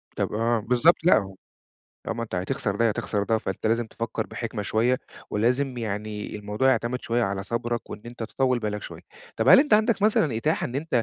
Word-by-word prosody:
طب - - -2
آه 115 +1 +1
بالضبط 125 +10 +4
لأ. 100 - +3 0.7
طالما 115 +1 -3
أنت 110 - -6
هتخسر 95 +2 -2
ده 115 - +2
يا 110 - +3
تخسر 105 0 -2
ده 110 +1 +1
فأنت 95 +1 -4
لازم 115 +1 +1
تفكّر 115 -1 -4
بحِكمة 115 -3 -5
شوية. 120 +5 +1 0.3
ولازم 125 +4 0
يعني 105 -1 -4
الموضوع 105 +5 0
يعتمد 125 -1 0
شوية 120 +1 0
على 95 -2 -2
صبرك، 120 +2 -3
وإن 105 - -8
أنت 120 -1 -8
تطوّل 130 +2 0
بالك 105 -2 -3
شوية، - - -9 0.4
طب 115 +4 +1
هل 270 - +9
أنت 295 -7 +3
عندَك 215 -1 +2
مثلًا 165 - +3
إتاحة 150 +8 0
إن 120 - -5
أنت 140 -4 0
115 Hz, 195 wpm, -25 LUFS, 105-125 Hz, 0.7 s, هل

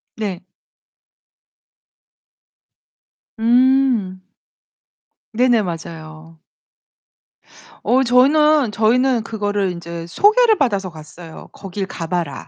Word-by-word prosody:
네. 200 -5 -4 3.0
음. 240 -5 +2 1.1
네네. 240 0 +2
맞아요. 160 -2 -9 1.4
어 260 +2 +2
저희는, 280 +1 +3
저희는 235 +2 +1
그거를 205 -4 -2
인제 170 -1 -8
소개를 435 - +3
받아서 200 -9 -1
갔어요. 160 +1 -13
"거길 195 0 -6
가 165 -3 -7
봐라. 170 -4 -4
210 Hz, 160 characters per minute, -18 LUFS, 170-255 Hz, 3.0 s, 저희는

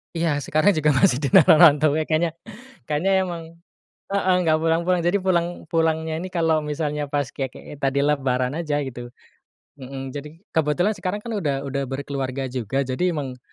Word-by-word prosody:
Iya 165 -3 0
sekarang 155 +8 +2
juga 150 0 +3
masih 125 0 +3
di 145 - -1
tanah 160 +1 +6
rantau 150 -2 +6
ya 155 - -2
kayaknya 160 +1 +1 0.6
kayaknya 155 +6 0
emang 175 -3 -4 0.7
heeh, 190 -2 +2
nggak 155 -1 +3
pulang-pulang 170 +2 +1
jadi 175 +4 +2
pulang 180 -3 +1 0.2
pulangnya 160 -1 0
ini 185 - -5
kalau 165 -3 +1
misalnya 150 0 -2
pas 145 -3 0
kayak 135 -2 -3
kayak 145 - -11
tadi 135 +1 +1
lebaran 135 -2 0
aja 150 -3 -1
gitu, 120 -1 -8 0.7
mhm, 135 0 -7
jadi 145 +1 -5 0.2
kebetulan 160 +6 +1
sekarang 185 +1 -3
kan 235 - -6
udah 145 -6 -1
udah 140 0 -2
berkeluarga 135 -1 -4
juga 130 +2 -1
jadi 130 +6 -3
emang 130 -4 -5
150 Hz, 170 wpm, -23 LUFS, 135-165 Hz, 0.7 s, tanah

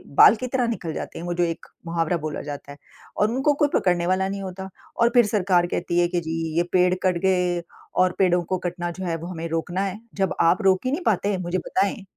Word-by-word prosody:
बाल 210 - +8
की 255 - -2
तरह 250 -1 0
निकल 175 -9 -3
जाते - - -6
हैं, 170 - -6
वो 175 - -2
जो 175 0 +1
एक 165 -1 -3 0.2
मुहावरा 165 0 0
बोला 155 -2 -4
जाता 145 -1 -7
है। 140 - -11 0.4
और 210 +2 +2
उनको 270 +4 +2
कोई 295 - +6
पकड़ने 175 -2 +2
वाला 185 +1 +1
नहीं 195 0 -4
होता 190 0 -6 0.3
और 235 - +6
फिर 240 -2 +6
सरकार 185 -4 +2
कहती 175 0 -1
है 175 - +4
कि 175 0 -1
जी 160 - -2 0.2
ये 170 - +4
पेड़ 180 0 +4
कट 185 -2 +2
गए 180 -2 +2 0.4
और 185 - +2
पेड़ों 180 -2 +3
को 185 +2 -2
कटना 175 0 -4
जो 190 +2 -6
है 170 -2 -1
वो 165 +1 -7
हमें 165 -2 -5
रोकना 175 +3 -2
है। 195 +2 -4 0.2
जब 195 -2 0
आप 170 +2 +3
रोक 190 +3 +3
ही 255 - +1
नहीं 320 +6 -2
पाते, 205 -1 +1
मुझे 180 0 -2
बताएँ। 195 +2 -1
180 Hz, 240 wpm, -24 LUFS, 175-195 Hz, 0.4 s, बाल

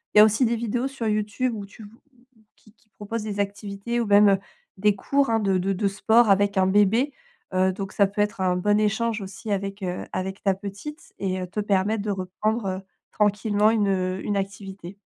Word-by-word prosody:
Il - - +4
y - - +11
a - - +9
aussi 215 +4 +2
des 235 0 +1
vidéos 235 +3 -1
sur 270 -4 -4
YouTube 215 +4 0
où 205 -2 -6
tu 215 +2 -14
v 205 - -11 0.7
qui 215 - -22
qui 215 0 -35
proposent 210 +2 -5
des 205 -1 -4
activités 200 +3 -3
ou - - -1
même 205 -1 +6 0.4
des 205 +1 +3
cours, 280 +6 +1
hein, 225 0 +2
de 195 -3 +1
de 190 +2 0
de 200 +2 0
sport 220 +3 +3
avec 200 0 +3
un 185 0 +4
bébé, 210 +8 +3 0.4
heu, 185 0 +3
donc 195 0 -6
ça 200 - +4
peut 205 +2 -8
être 210 -1 -1
un 180 -1 +2
bon 205 +3 +2
échange 220 +1 0
aussi 195 +3 -8
avec, 200 0 -3
heu, 180 -1 -3
avec 190 +1 -4
ta 195 - +3
petite 205 +10 -9
et 185 -1 -2
te 190 +4 -5
permettre 205 +1 +1
de 210 - -1
reprendre 195 +1 -2 0.3
tranquillement 210 +1 +2
une 190 -4 0
une 205 - -1
activité. 195 -1 -6
205 Hz, 205 wpm, -24 LUFS, 195-215 Hz, 0.7 s, y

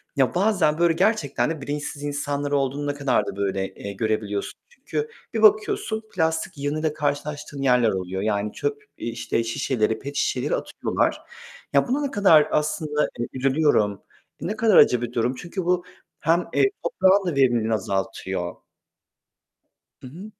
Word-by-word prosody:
ya, 135 +2 +2
bazen 180 -6 +2
böyle 170 -1 +4
gerçekten 165 - +1
de 160 -3 -4
bilinçsiz 145 +1 -5
insanlar 145 0 -2
olduğunu 140 +1 0
ne 145 - 0
kadar 140 -7 +1
da - - -5
böyle, 95 -1 -2
eee, 100 0 -7
görebiliyorsun. 105 -1 -2
Çünkü 455 -1 -4 0.2
bir 225 - -1
bakıyorsun 215 0 +3
plastik 160 0 0
yığınıyla 150 +2 -1
karşılaştığın 145 -1 -3
yerler 125 -4 +4
oluyor 95 -1 -3
yani 105 0 -1
çöp, 430 0 -3
eee, - - -5
işte 115 0 -2
şişeleri, 115 -2 0
pet 140 +1 -7
şişeleri - - 0
atıyorlar. - - -1 0.5
Ya, - - +4
buna 270 +4 0
ne 280 -2 -2
kadar 170 - +5
aslında 150 0 0 0.2
hani 120 - -2
üzülüyorum, 130 - +2 0.4
ne 210 +4 -2
kadar 220 -3 +4
acı 125 -1 +6
bir 120 0 -4
durum... 120 +2 0
Çünkü 175 +5 -5
bu 180 0 +2 0.4
hem, 170 +3 +1
eee, - - +3 0.2
toprağın 195 - +3
da 165 - -1
verimliliğini 120 -5 +2
azaltıyor. 95 -3 -2 1.5
Hı - - -9
hı. 185 +11 -10
145 Hz, 155 wpm, -24 LUFS, 115-175 Hz, 1.5 s, acı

